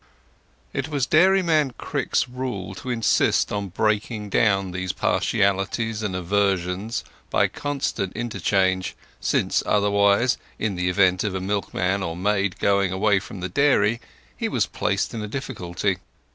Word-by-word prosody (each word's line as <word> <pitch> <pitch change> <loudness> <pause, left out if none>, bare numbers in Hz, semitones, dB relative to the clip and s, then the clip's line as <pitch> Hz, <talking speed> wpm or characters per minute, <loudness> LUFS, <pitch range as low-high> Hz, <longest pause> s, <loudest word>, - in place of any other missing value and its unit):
It 135 +2 -2
was 140 -4 0
Dairyman 160 -4 +3
Crick's - - -1
rule 125 -7 -5
to 125 +6 -8
insist 115 -3 +2
on 100 -1 -2
breaking 105 +1 -1
down 95 -4 +2
these 95 0 -3
partialities 100 +3 0
and 105 -4 -2
aversions 95 +2 0 0.3
by - - +3
constant 140 -9 -3
interchange, 95 -5 0 0.2
since - - +1
otherwise, 100 +3 +3 0.2
in 110 -2 -1
the 90 0 -1
event 90 -1 +3
of 100 -3 -2
a - - -1
milkman 100 0 -1
or 85 -3 -3
maid 100 0 0
going 100 -2 +2
away 100 +1 +2
from 95 -1 -9
the 95 - -3
dairy, 115 -1 +3 0.3
he - - -2
was - - +1
placed - - -1
in 115 - -4
a 105 - -4
difficulty. 100 -7 -3
100 Hz, 140 wpm, -24 LUFS, 95-115 Hz, 0.3 s, Dairyman